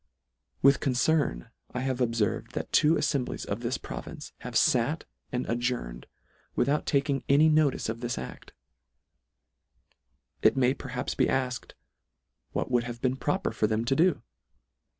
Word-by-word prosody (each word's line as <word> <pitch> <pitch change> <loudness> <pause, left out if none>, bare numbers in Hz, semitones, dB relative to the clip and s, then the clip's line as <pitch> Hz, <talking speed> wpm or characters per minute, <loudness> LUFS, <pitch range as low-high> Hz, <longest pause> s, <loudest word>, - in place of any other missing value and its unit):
With 140 +1 +6
concern 130 - +1 0.2
I 125 - -1
have 130 -1 -1
obferved 115 -4 0
that - - -4
two 155 +2 +5
aflemblies 140 -5 -1
of 100 - -3
this 120 +1 -2
province - - -8
have - - -8
fat - - +3 0.3
and 125 0 -2
ad 120 +1 0
journed, 120 - -3 0.5
without 140 +4 +1
taking 140 -1 +1
any 150 +3 +6
notice 155 -3 +2
of 110 +1 -3
this 120 0 -3
ad:. 65 - -8 1.9
It - - +4
may 130 0 +4
perhaps 125 -3 -4
be - - +2
alked, 125 -2 -2 0.8
what - - -2
would 120 -1 +2
have 120 -1 -6
been 130 +1 +1
proper 185 +8 -1
for 105 - +1
them 110 +2 0
to 135 - +2
do 165 -5 +3
125 Hz, 150 wpm, -28 LUFS, 120-140 Hz, 1.9 s, With